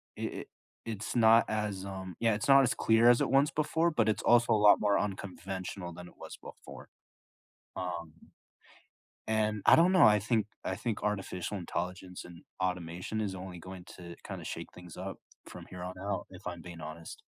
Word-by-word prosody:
it -, -, -4 dB
it -, -, -12 dB, 0.4 s
it's 110 Hz, 0 st, -5 dB
not 115 Hz, 0 st, +6 dB
as, 105 Hz, -3 st, -2 dB
um 95 Hz, -2 st, -7 dB
yeah, 115 Hz, -1 st, +3 dB
it's 105 Hz, -, -3 dB
not 135 Hz, 0 st, +8 dB
as 125 Hz, -, +2 dB
clear 115 Hz, +1 st, +5 dB
as 120 Hz, -, +5 dB
it -, -, +1 dB
once 140 Hz, +2 st, +4 dB
before, 160 Hz, +2 st, +1 dB
but 115 Hz, -9 st, +1 dB
it's 110 Hz, -, 0 dB
also 120 Hz, -1 st, +4 dB
a -, -, +4 dB
lot 105 Hz, 0 st, +6 dB
more 105 Hz, -1 st, +2 dB
unconventional 95 Hz, -2 st, -5 dB
than 90 Hz, +1 st, -10 dB
it -, -, -15 dB
was -, -, -9 dB
before. -, -, -12 dB, 0.9 s
Um, 85 Hz, -3 st, -4 dB, 1.2 s
and 110 Hz, -1 st, 0 dB
I -, -, +8 dB
don't 175 Hz, +3 st, +5 dB
know, 185 Hz, -, +6 dB
I 105 Hz, 0 st, +6 dB
think 110 Hz, 0 st, +1 dB, 0.2 s
I 95 Hz, -, -2 dB
think 115 Hz, -2 st, -3 dB
artificial 100 Hz, -1 st, -2 dB
intelligence 90 Hz, +1 st, -5 dB
and 85 Hz, 0 st, -13 dB, 0.2 s
automation 90 Hz, +3 st, -2 dB
is 100 Hz, -3 st, -2 dB
only 90 Hz, -1 st, -8 dB
going 95 Hz, +1 st, -9 dB
to 85 Hz, -1 st, -9 dB
kinda -, -, -6 dB
shake -, -, -6 dB
things 90 Hz, -1 st, -12 dB
up 95 Hz, +1 st, -6 dB, 0.3 s
from -, -, -10 dB
here 90 Hz, -1 st, -8 dB
on 90 Hz, +1 st, -6 dB
out, 100 Hz, 0 st, -3 dB
if 90 Hz, -, -10 dB
I'm 85 Hz, -1 st, -5 dB
being 85 Hz, 0 st, -10 dB
honest. 80 Hz, +1 st, -9 dB
95 Hz, 190 wpm, -31 LUFS, 90-110 Hz, 1.2 s, not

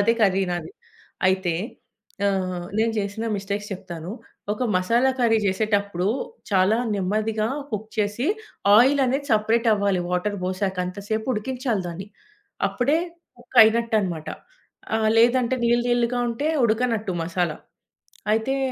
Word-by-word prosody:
అదే 230 Hz, +3 st, +3 dB
కర్రీ 195 Hz, -1 st, +3 dB
నాది. 175 Hz, -2 st, -5 dB, 0.6 s
అయితే 185 Hz, -3 st, +1 dB, 0.7 s
ఆహ్, 185 Hz, -3 st, -1 dB
నేను 225 Hz, +1 st, +2 dB
చేసిన 205 Hz, +3 st, -3 dB
మిస్టేక్స్ 200 Hz, +1 st, -3 dB
చెప్తాను. 175 Hz, -2 st, -7 dB, 0.4 s
ఒక 250 Hz, +4 st, -2 dB
మసాలా 230 Hz, +8 st, +3 dB
కర్రీ 225 Hz, -2 st, +3 dB
చేసేటప్పుడు 200 Hz, -2 st, 0 dB, 0.4 s
చాలా 195 Hz, +2 st, +3 dB, 0.2 s
నెమ్మదిగా 215 Hz, +3 st, 0 dB, 0.2 s
కుక్ 215 Hz, 0 st, -4 dB
చేసి 210 Hz, +6 st, 0 dB, 0.5 s
ఆయిలనేది 270 Hz, +3 st, +4 dB
సెపరేటవ్వాలి. 215 Hz, -3 st, +2 dB
వాటర్ 200 Hz, +3 st, -1 dB
పోసాక 185 Hz, +1 st, -2 dB
అంత 180 Hz, +1 st, -6 dB
సేపు 220 Hz, 0 st, -1 dB
ఉడికించాలి 245 Hz, -1 st, -2 dB
దాన్ని. 175 Hz, +3 st, -6 dB, 0.6 s
అప్పుడే 280 Hz, +5 st, +1 dB, 0.4 s
కుక్ 245 Hz, -, -3 dB
అయినట్టన్నమాట. 220 Hz, -8 st, +1 dB, 0.7 s
ఆహ్, 220 Hz, -1 st, +2 dB
లేదంటే 245 Hz, +2 st, +3 dB
నీళ్లు, 240 Hz, +1 st, +2 dB
నీళ్లుగా 240 Hz, 0 st, +1 dB
ఉంటే 280 Hz, +7 st, -1 dB, 0.2 s
ఉడకనట్టు 225 Hz, -3 st, 0 dB
మసాలా. 170 Hz, -2 st, -1 dB, 0.8 s
అయితే 265 Hz, +5 st, 0 dB
215 Hz, 115 wpm, -24 LUFS, 190-235 Hz, 0.8 s, ఆయిలనేది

